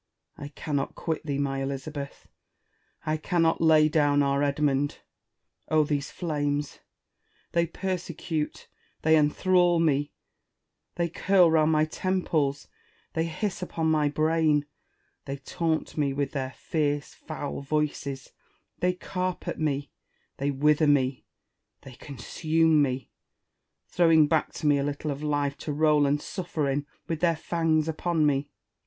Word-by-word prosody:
I 145 Hz, -, -7 dB
cannot 145 Hz, -1 st, -3 dB
quit 160 Hz, -1 st, -3 dB
thee, 140 Hz, -1 st, -1 dB
my 135 Hz, -1 st, -1 dB
Elizabeth! 140 Hz, +1 st, -5 dB, 0.8 s
I 155 Hz, 0 st, 0 dB
cannot 165 Hz, 0 st, +1 dB
lay 155 Hz, -1 st, +6 dB
down 145 Hz, -2 st, +3 dB
our 140 Hz, 0 st, +1 dB
Edmund! 145 Hz, 0 st, +1 dB, 0.7 s
Oh, 155 Hz, -1 st, +4 dB
these 145 Hz, -1 st, -2 dB
flames! 145 Hz, -3 st, -2 dB, 0.7 s
They 170 Hz, 0 st, +2 dB
persecute, 170 Hz, -3 st, -4 dB, 0.4 s
they 160 Hz, 0 st, +5 dB
enthrall 175 Hz, +3 st, +3 dB
me; 145 Hz, -3 st, +1 dB, 0.8 s
they 170 Hz, -1 st, 0 dB
curl 180 Hz, 0 st, +3 dB
round 160 Hz, -1 st, +4 dB
my 155 Hz, 0 st, +3 dB
temples; 155 Hz, -5 st, -1 dB, 0.5 s
they 160 Hz, 0 st, 0 dB
hiss 180 Hz, +4 st, -3 dB
upon 160 Hz, -3 st, -1 dB
my 150 Hz, -2 st, +2 dB
brain; 155 Hz, 0 st, +2 dB, 0.6 s
they 135 Hz, 0 st, -4 dB
taunt 160 Hz, +4 st, -2 dB
me 145 Hz, -3 st, 0 dB
with 140 Hz, 0 st, -2 dB
their 130 Hz, -2 st, -4 dB
fierce, 145 Hz, -2 st, -1 dB
foul 145 Hz, -, -6 dB
voices; 140 Hz, -2 st, -2 dB, 0.5 s
they 180 Hz, +1 st, +2 dB
carp 185 Hz, 0 st, -4 dB
at -, -, -3 dB
me, 145 Hz, -3 st, -1 dB, 0.5 s
they 140 Hz, +1 st, -1 dB
wither 150 Hz, +2 st, +3 dB
me, 135 Hz, -3 st, +2 dB, 0.6 s
they 135 Hz, -, -11 dB
consume 155 Hz, +5 st, +1 dB
me, 130 Hz, -2 st, -1 dB, 0.7 s
throwing 165 Hz, -3 st, +4 dB
back 160 Hz, 0 st, +1 dB
to -, -, -6 dB
me 145 Hz, -1 st, +4 dB
a -, -, 0 dB
little 145 Hz, +1 st, -3 dB
of 140 Hz, +1 st, -5 dB
life 145 Hz, -2 st, -1 dB
to 150 Hz, -, -4 dB
roll 150 Hz, -1 st, +3 dB
and 145 Hz, +1 st, +1 dB
sufier 160 Hz, -6 st, -2 dB
in, 145 Hz, +1 st, -3 dB, 0.2 s
with 165 Hz, -3 st, -2 dB
their 170 Hz, -1 st, +2 dB
fangs 160 Hz, -1 st, 0 dB
upon 160 Hz, 0 st, 0 dB
me. 145 Hz, 0 st, +1 dB
150 Hz, 135 wpm, -27 LUFS, 145-165 Hz, 0.8 s, lay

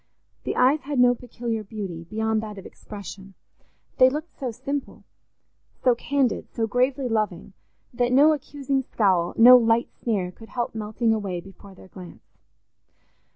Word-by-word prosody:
The -, -, -2 dB
eyes 265 Hz, +5 st, +4 dB
had 280 Hz, +1 st, -4 dB
no 245 Hz, 0 st, +5 dB
peculiar 235 Hz, -2 st, -5 dB
beauty, 195 Hz, -5 st, -7 dB
beyond 220 Hz, +3 st, -1 dB
that 210 Hz, -2 st, -8 dB
of 195 Hz, -, -10 dB
expression; 195 Hz, -2 st, -10 dB, 0.6 s
they 255 Hz, -, +8 dB
looked 305 Hz, +5 st, -6 dB
so 260 Hz, -, -2 dB
simple, 280 Hz, +4 st, -5 dB, 0.8 s
so 250 Hz, -, +5 dB
candid, 265 Hz, +1 st, -1 dB
so 225 Hz, -, -1 dB
gravely 255 Hz, +4 st, 0 dB
loving, 210 Hz, -5 st, -2 dB, 0.4 s
that 245 Hz, 0 st, 0 dB
no 290 Hz, +5 st, +6 dB
accusing 275 Hz, -1 st, -2 dB
scowl, 190 Hz, -8 st, +1 dB
no 245 Hz, +2 st, +10 dB
light 230 Hz, 0 st, +2 dB
sneer 195 Hz, -6 st, -2 dB
could 225 Hz, +4 st, -15 dB
help 240 Hz, -1 st, -3 dB
melting 220 Hz, +1 st, -1 dB
away 195 Hz, -5 st, -3 dB
before 195 Hz, +2 st, -14 dB
their 190 Hz, -, -16 dB
glance. 180 Hz, -3 st, -14 dB
225 Hz, 150 wpm, -24 LUFS, 200-255 Hz, 0.8 s, no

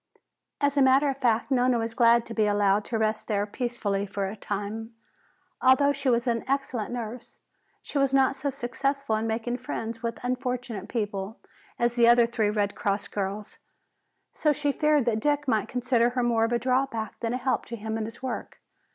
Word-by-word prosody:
As 285 Hz, 0 st, +1 dB
a -, -, +5 dB
matter 270 Hz, +2 st, +5 dB
of 270 Hz, -, -2 dB
fact, 235 Hz, -1 st, +1 dB
Nona 250 Hz, -1 st, +3 dB
was 225 Hz, 0 st, -2 dB
glad 235 Hz, 0 st, +4 dB
to 230 Hz, -, -7 dB
be 215 Hz, -2 st, +2 dB
allowed 205 Hz, 0 st, +2 dB
to 230 Hz, -, -2 dB
rest 220 Hz, 0 st, -1 dB
there 205 Hz, -2 st, 0 dB
peacefully 210 Hz, -3 st, -2 dB
for 200 Hz, 0 st, -3 dB
a 195 Hz, +2 st, -4 dB
time. 210 Hz, +3 st, -5 dB, 0.7 s
Although 280 Hz, +2 st, +5 dB
she 275 Hz, -1 st, -1 dB
was 235 Hz, 0 st, +2 dB
an 230 Hz, -2 st, 0 dB
excellent 265 Hz, -6 st, -1 dB
nurse, 240 Hz, 0 st, -6 dB, 0.5 s
she 285 Hz, -, -2 dB
was 275 Hz, -1 st, +2 dB
not 270 Hz, 0 st, +3 dB
so 280 Hz, +1 st, -2 dB
successful 275 Hz, -1 st, -2 dB
in 220 Hz, +1 st, -1 dB
making 230 Hz, +2 st, -2 dB
friends 230 Hz, -2 st, -5 dB
with 230 Hz, -1 st, -3 dB
unfortunate 250 Hz, -4 st, -3 dB
people 205 Hz, -2 st, -3 dB, 0.4 s
as 235 Hz, 0 st, +1 dB
the 235 Hz, -1 st, +6 dB
other 240 Hz, 0 st, +6 dB
three 230 Hz, -3 st, 0 dB
Red 205 Hz, -1 st, 0 dB
Cross 200 Hz, 0 st, -2 dB
girls. 200 Hz, +1 st, -4 dB, 0.7 s
So 305 Hz, -, +2 dB
she 290 Hz, 0 st, 0 dB
feared 300 Hz, -2 st, +2 dB
that 225 Hz, -3 st, +1 dB
Dick 290 Hz, +3 st, 0 dB
might 220 Hz, -4 st, +1 dB
consider 245 Hz, -1 st, +2 dB
her 250 Hz, 0 st, -1 dB
more 230 Hz, -2 st, +2 dB
of 230 Hz, -, -3 dB
a 240 Hz, -, +3 dB
drawback 250 Hz, -3 st, -1 dB
than 230 Hz, 0 st, -2 dB
a -, -, 0 dB
help 260 Hz, +1 st, -1 dB
to 235 Hz, -, -6 dB
him 220 Hz, 0 st, -4 dB
in 220 Hz, -1 st, -2 dB
his 230 Hz, +3 st, -10 dB
work. 260 Hz, -, -5 dB
235 Hz, 195 wpm, -27 LUFS, 220-260 Hz, 0.7 s, the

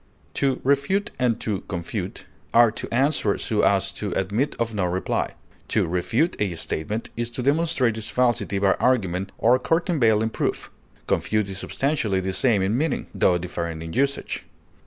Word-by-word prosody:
To 135 Hz, -2 st, +1 dB
refute 145 Hz, +9 st, +1 dB
and 125 Hz, -3 st, +1 dB
to 105 Hz, -4 st, -2 dB
confute 85 Hz, -2 st, -5 dB, 0.3 s
are 120 Hz, -1 st, +7 dB
to -, -, -6 dB
answer 130 Hz, -4 st, +2 dB
so 105 Hz, -2 st, 0 dB
as 95 Hz, -1 st, +2 dB
to 100 Hz, 0 st, -4 dB
admit 105 Hz, +9 st, 0 dB
of 115 Hz, -1 st, -1 dB
no 100 Hz, -3 st, 0 dB
reply. 90 Hz, +1 st, -1 dB, 0.3 s
To -, -, +2 dB
refute 115 Hz, -, 0 dB
a 95 Hz, -5 st, 0 dB
statement 90 Hz, +7 st, -3 dB
is 120 Hz, 0 st, -2 dB
to 120 Hz, +1 st, -5 dB
demonstrate 140 Hz, -5 st, +2 dB
its 110 Hz, -, -3 dB
falsity 120 Hz, -5 st, +1 dB
by 100 Hz, 0 st, +3 dB
argument 95 Hz, -7 st, +1 dB
or 125 Hz, +3 st, +4 dB
countervailing 125 Hz, -, +2 dB
proof; -, -, -2 dB, 0.3 s
confute 110 Hz, -2 st, 0 dB
is 95 Hz, 0 st, -5 dB
substantially 130 Hz, -9 st, 0 dB
the 95 Hz, 0 st, -2 dB
same 105 Hz, -1 st, +3 dB
in 100 Hz, +4 st, +1 dB
meaning, 150 Hz, +3 st, -1 dB
tho 90 Hz, -, +3 dB
differing 85 Hz, -2 st, -4 dB
in 80 Hz, 0 st, -7 dB
usage. 140 Hz, +1 st, -1 dB
110 Hz, 160 wpm, -24 LUFS, 95-130 Hz, 0.3 s, are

